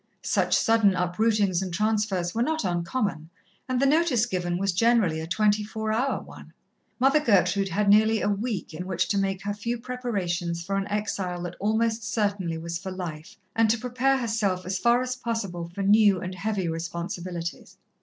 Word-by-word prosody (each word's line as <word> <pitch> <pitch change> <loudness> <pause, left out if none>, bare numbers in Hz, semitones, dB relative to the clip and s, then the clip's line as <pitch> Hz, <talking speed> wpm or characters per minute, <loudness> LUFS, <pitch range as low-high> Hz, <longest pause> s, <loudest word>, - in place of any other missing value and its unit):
Such - - +2
sudden 225 -4 +3
uprootings 190 +1 +1
and 185 -2 -4
transfers 205 -2 0
were 230 - -1
not 315 +5 0
uncommon, 175 -2 -2 0.4
and 255 -1 +1
the 275 - +3
notice 285 -5 +3
given 175 -5 -2
was 195 +1 0
generally 205 -4 +2
a 160 - -5
twenty 210 +4 +2
four 220 +1 -3
hour 260 +5 0
one. - - -13 0.5
Mother 270 +4 +4
Gertrude 200 -6 +2
had 200 +4 0
nearly 220 +2 +5
a - - 0
week 205 -3 -2
in 180 +4 -6
which 185 -1 0
to 200 - +1
make 195 -1 -1
her 205 0 -2
few 230 +4 -3
preparations 190 -9 -3
for 195 +1 -2
an 195 0 -1
exile 200 -4 -2
that 175 0 -5
almost 220 +2 0
certainly 205 -5 -1
was 170 +1 -4
for 190 - -6
life, 165 -4 -7 0.2
and 225 -1 +3
to 230 - +3
prepare 250 +3 +1
herself 215 -7 -1
as 185 +1 -2
far 240 +3 +3
as 255 0 -3
possible 200 -9 -4
for 200 - -2
new 205 -1 +5
and 185 +1 -5
heavy 195 -1 -2
responsibilities. 170 +1 -5
200 Hz, 180 wpm, -26 LUFS, 180-225 Hz, 0.5 s, nearly